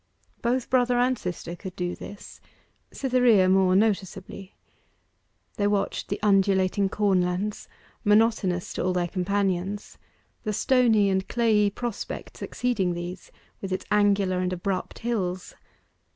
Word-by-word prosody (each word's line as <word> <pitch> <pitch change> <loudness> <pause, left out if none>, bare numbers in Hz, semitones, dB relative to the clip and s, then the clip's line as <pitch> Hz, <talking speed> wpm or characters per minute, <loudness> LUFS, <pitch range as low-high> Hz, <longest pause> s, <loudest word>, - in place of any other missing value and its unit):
Both 245 +1 -1
brother 245 -1 +3
and 250 +1 +3
sister 175 -4 -5
could 185 +1 -9
do 180 -1 -3
this; 205 0 -11 0.5
Cytherea 250 -7 +3
more 185 0 +4
noticeably. 195 -2 -1 1.0
They 205 - +2
watched 205 -1 -1
the 200 - -2
undulating 195 -1 +3
corn 195 -2 +2
lands, 180 +4 -2 0.4
monotonous 210 -4 +2
to - - -2
all 185 +1 +1
their 175 -1 0
companions; 195 +1 -2 0.4
the 215 -2 -3
stony 225 -3 +3
and 190 0 0
clayey 220 -4 +3
prospect 235 +1 -6
succeeding 200 -8 -1
those, 175 +1 -7 0.3
with 195 - -5
its 185 - -3
angular 200 -3 +3
and 180 0 -1
abrupt 185 +1 -3
hills. 185 -6 -3
200 Hz, 125 wpm, -26 LUFS, 185-215 Hz, 1.0 s, more